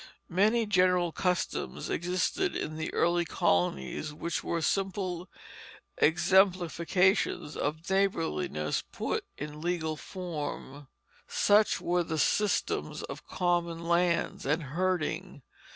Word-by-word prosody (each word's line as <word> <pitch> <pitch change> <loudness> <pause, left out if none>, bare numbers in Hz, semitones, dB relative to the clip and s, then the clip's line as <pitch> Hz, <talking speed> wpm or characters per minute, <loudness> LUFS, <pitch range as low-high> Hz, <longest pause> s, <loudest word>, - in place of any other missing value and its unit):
Many 215 +6 +3
general 180 -3 +3
customs 180 - -2
existed 185 - 0
in 155 - -3
the 160 - -3
early 175 0 +2
colonies 90 - 0
which 170 +2 -3
were 170 - -1
simply 185 0 -1 0.7
exemplifications 180 -1 +3
of 155 +3 -3
neighborliness 160 - 0
put - - -3
in 150 +1 -6
legal 165 -2 -1
form. 150 -5 -6 0.4
Such 210 +1 +3
were 175 0 +1
the 160 -1 -3
systems 210 +6 0
of - - -8
common 175 -2 0
lands 170 0 +1
and 150 +4 0
herding. 175 +1 -2
175 Hz, 105 wpm, -30 LUFS, 155-185 Hz, 0.7 s, Many